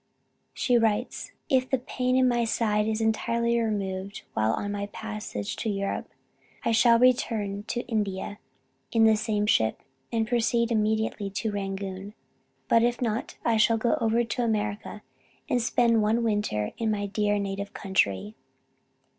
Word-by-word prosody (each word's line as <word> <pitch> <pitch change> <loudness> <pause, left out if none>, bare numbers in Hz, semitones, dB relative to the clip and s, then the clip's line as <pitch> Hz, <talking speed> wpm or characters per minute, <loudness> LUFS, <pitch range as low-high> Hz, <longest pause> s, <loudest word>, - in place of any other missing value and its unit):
She 245 -2 +3
writes: 225 +2 -1 0.2
"If 255 -1 +2
the 265 - +2
pain 255 0 -1
in 260 0 +4
my 240 -1 +2
side 215 -2 +1
is 220 0 -1
entirely 235 +1 +1
removed 200 -3 -3
while 110 0 +2
on 205 - -2
my 205 0 -3
passage 210 - -5
to 225 - -2
Europe, 200 -1 -2 0.6
I - - +2
shall 230 +1 +5
return 220 -5 +1
to 240 - -2
India 205 -3 -2 0.5
in 225 -1 +4
the 220 0 +6
same 215 -1 0
ship, 110 - +2 0.3
and 225 -1 0
proceed 235 0 +1
immediately 220 -2 0
to 215 +3 -2
Rangoon. 195 0 -5 0.5
But 230 - +5
if 240 +1 +1
not 230 -2 -2
I 230 -1 +3
shall 225 +1 +4
go 230 +1 +2
over 230 +1 +2
to 240 +1 -2
America, 210 -1 -2 0.4
and 245 - +1
spend 230 -1 +3
one 220 +3 +2
winter 205 - 0
in 225 -1 0
my 205 -1 -1
dear 205 0 0
native 200 0 -3
country. 105 - 0
220 Hz, 155 wpm, -27 LUFS, 205-235 Hz, 0.6 s, the